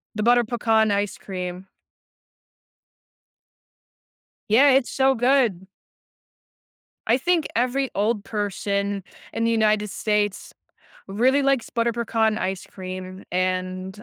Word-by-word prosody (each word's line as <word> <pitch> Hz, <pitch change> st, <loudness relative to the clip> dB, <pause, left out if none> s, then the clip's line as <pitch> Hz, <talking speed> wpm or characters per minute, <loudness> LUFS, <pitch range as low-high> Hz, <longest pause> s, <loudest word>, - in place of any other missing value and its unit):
the 215 Hz, -, -1 dB
butter 240 Hz, +1 st, +4 dB
pecan 225 Hz, -2 st, +1 dB
ice 200 Hz, 0 st, -1 dB
cream. 180 Hz, -1 st, -6 dB, 2.8 s
Yeah, 265 Hz, +7 st, +6 dB
it's 265 Hz, -1 st, +3 dB
so 270 Hz, 0 st, +2 dB
good. 245 Hz, -7 st, +2 dB, 1.4 s
I 235 Hz, -, +4 dB
think 335 Hz, +3 st, +1 dB
every 255 Hz, +3 st, 0 dB
old 210 Hz, +1 st, 0 dB
person 200 Hz, -1 st, -2 dB, 0.3 s
in 230 Hz, -, -2 dB
the 230 Hz, -, +2 dB
United 215 Hz, -2 st, +2 dB
States 210 Hz, -1 st, -1 dB, 0.6 s
really 255 Hz, +8 st, +2 dB
likes 275 Hz, -3 st, +1 dB
butter 235 Hz, 0 st, 0 dB
pecan 225 Hz, -2 st, 0 dB
ice 190 Hz, 0 st, -3 dB
cream, 185 Hz, 0 st, -8 dB
and 185 Hz, +2 st, -2 dB
215 Hz, 105 wpm, -23 LUFS, 195-240 Hz, 2.8 s, Yeah